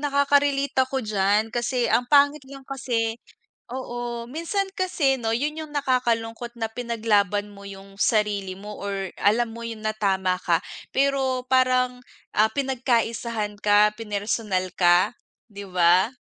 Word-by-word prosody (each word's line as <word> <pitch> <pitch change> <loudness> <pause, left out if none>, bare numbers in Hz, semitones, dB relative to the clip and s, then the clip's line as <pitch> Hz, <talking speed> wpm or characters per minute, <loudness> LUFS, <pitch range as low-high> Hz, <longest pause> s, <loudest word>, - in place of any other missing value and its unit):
nakaka-relate 280 -1 +2 0.2
ko 265 -2 -2
d'yan. 210 +1 +1
Kasi 245 +1 0
ang 245 0 +2
pangit 285 +1 +5
lang 275 -1 -11
kasi 235 -4 -2 0.5
oo. 240 -2 -5
Minsan 335 +7 -2
kasi 320 -8 +1
'no 225 -3 -2
yun 290 +6 -1
yung 310 -2 -7
nakakalungkot 240 -4 -1
na 225 - 0
pinaglaban 215 -4 0
mo 200 -1 -13
yung 195 0 -11
sarili 205 -3 +1
mo 205 +3 -9
or 195 -1 -4
alam 230 +3 +2
mo 235 - -7
yun 225 -1 -6
na 215 0 -2
tama 190 -3 +1
ka 170 -1 +2 0.3
pero 270 -1 +1
parang, 255 -1 +2 0.4
ah, 215 - +6
pinagkaisahan 235 -5 -1
ka, 210 0 +4
pinersonal 205 -3 -2
ka, 180 +6 +4 0.3
'di 200 -2 -9
ba? 180 +5 +4
230 Hz, 135 wpm, -24 LUFS, 205-260 Hz, 0.5 s, ah